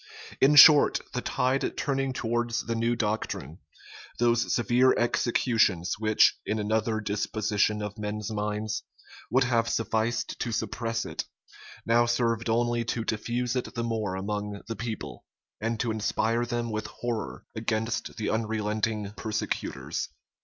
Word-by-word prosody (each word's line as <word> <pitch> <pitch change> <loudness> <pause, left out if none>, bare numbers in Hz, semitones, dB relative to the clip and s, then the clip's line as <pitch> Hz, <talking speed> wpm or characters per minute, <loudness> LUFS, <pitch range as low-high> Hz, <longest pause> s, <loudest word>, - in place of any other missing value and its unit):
In 140 +3 +5
short, 150 0 +9
the - - -1
tide 130 +2 0
turning 135 -1 0
towards 120 -1 -1
the 115 - -1
new 115 +1 +1
doctrine, 105 - -3 0.6
those 120 -1 +2
severe 125 +2 +4
executions, 115 -6 +1
which, 110 -1 +4
in 110 - -1
another 110 +1 0
disposition 105 0 0
of 105 +1 -6
men's 105 0 -4
minds, 105 0 -2 0.5
would 130 +4 +3
have 115 -2 +1
sufficed 115 0 -1
to 120 - -2
suppress 115 +1 -2
it, - - -4 0.6
now 120 +1 +4
served 115 -1 0
only 120 +1 +1
to 115 -1 -2
diffuse 120 +3 -1
it 125 - -3
the 120 - -1
more 110 -5 -2
among 105 +1 -4
the 115 - -4
people, 115 0 -6 0.4
and 115 +1 -2
to 120 - 0
inspire 110 +2 0
them 120 -1 -2
with 110 0 -3
horror 115 0 -5
against 110 0 -2
the 110 - -2
unrelenting 110 -1 -1
persecutors. 110 -2 -3
115 Hz, 135 wpm, -27 LUFS, 105-120 Hz, 0.6 s, short